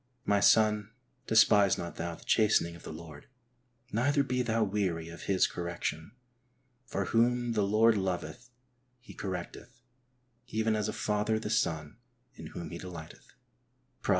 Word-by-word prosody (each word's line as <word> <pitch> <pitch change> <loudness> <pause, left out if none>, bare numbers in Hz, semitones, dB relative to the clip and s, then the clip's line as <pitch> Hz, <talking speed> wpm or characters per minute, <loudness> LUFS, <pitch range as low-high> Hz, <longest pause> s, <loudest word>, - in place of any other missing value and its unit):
My 100 0 +3
son, 105 0 +4 0.4
despise 105 -3 +5
not 85 - -6
thou 85 0 -3
the - - -16
chastening 105 -6 +3
of 85 - -13
the - - -8
Lord, 80 -2 -10 0.6
neither 140 +6 +2
be 125 -2 -1
thou 115 -2 +1
weary 95 -5 -1
of 85 - -9
His 95 -2 +3
correction, 85 -1 -4 0.7
for 95 0 -2
whom 120 +2 +2
the 110 -2 +1
Lord 110 +2 +4
loveth 95 +6 -3 0.5
He 125 - -13
correcteth; 100 +6 -7 0.6
even 110 -1 0
as 105 -1 -1
a - - -3
father 105 +1 0
the 110 -1 -4
son 80 -9 -1 0.4
in - - -10
whom 85 -3 -7
he 85 - -6
delighteth" 85 -4 -10 0.7
{Prov. - - -6
105 Hz, 150 wpm, -30 LUFS, 85-110 Hz, 0.7 s, despise